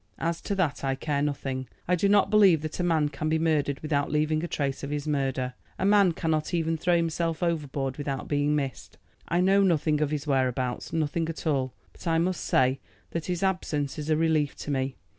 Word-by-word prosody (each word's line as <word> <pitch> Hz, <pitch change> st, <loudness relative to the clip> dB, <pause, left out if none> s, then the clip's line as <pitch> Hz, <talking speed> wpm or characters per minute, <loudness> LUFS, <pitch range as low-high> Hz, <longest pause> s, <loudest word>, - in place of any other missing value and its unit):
"As 165 Hz, 0 st, -2 dB
to 200 Hz, -, -2 dB
that 165 Hz, -8 st, 0 dB
I 135 Hz, -1 st, 0 dB
care 145 Hz, 0 st, -1 dB
nothing. 135 Hz, -3 st, -2 dB, 0.2 s
I 180 Hz, -, +2 dB
do 200 Hz, +3 st, +1 dB
not 200 Hz, -1 st, +4 dB
believe 195 Hz, -7 st, +5 dB
that 155 Hz, +2 st, -5 dB
a -, -, +1 dB
man 160 Hz, -4 st, +2 dB
can 150 Hz, +2 st, -3 dB
be 160 Hz, -, +2 dB
murdered 150 Hz, -4 st, +1 dB
without 145 Hz, -2 st, 0 dB
leaving 155 Hz, +1 st, +1 dB
a -, -, -1 dB
trace 140 Hz, -4 st, -2 dB
of 140 Hz, -, -5 dB
his 145 Hz, 0 st, -3 dB
murder. 135 Hz, -3 st, -1 dB, 0.2 s
A 190 Hz, -, -1 dB
man 200 Hz, -3 st, +5 dB
cannot 160 Hz, +1 st, -1 dB
even 165 Hz, -1 st, 0 dB
throw 175 Hz, +2 st, +2 dB
himself 165 Hz, 0 st, -1 dB
overboard 145 Hz, -5 st, -1 dB
without 140 Hz, -2 st, -3 dB
being 145 Hz, 0 st, +1 dB
missed. 135 Hz, -4 st, -4 dB, 0.3 s
I 175 Hz, +1 st, +1 dB
know 195 Hz, +2 st, +4 dB
nothing 155 Hz, -5 st, +2 dB
of 150 Hz, -, +2 dB
his 150 Hz, -1 st, -3 dB
whereabouts, 130 Hz, -3 st, 0 dB
nothing 160 Hz, +1 st, -1 dB
at 165 Hz, -, -6 dB
all. 135 Hz, -5 st, 0 dB, 0.2 s
But -, -, -10 dB
I 165 Hz, 0 st, +3 dB
must 175 Hz, +2 st, 0 dB
say 130 Hz, +1 st, +2 dB, 0.3 s
that 165 Hz, -2 st, -3 dB
his 180 Hz, 0 st, -2 dB
absence 155 Hz, -7 st, -1 dB
is 150 Hz, +1 st, -5 dB
a 155 Hz, -, +3 dB
relief 155 Hz, -3 st, +1 dB
to 145 Hz, -, -5 dB
me. 135 Hz, -1 st, -1 dB
155 Hz, 215 wpm, -27 LUFS, 140-170 Hz, 0.3 s, believe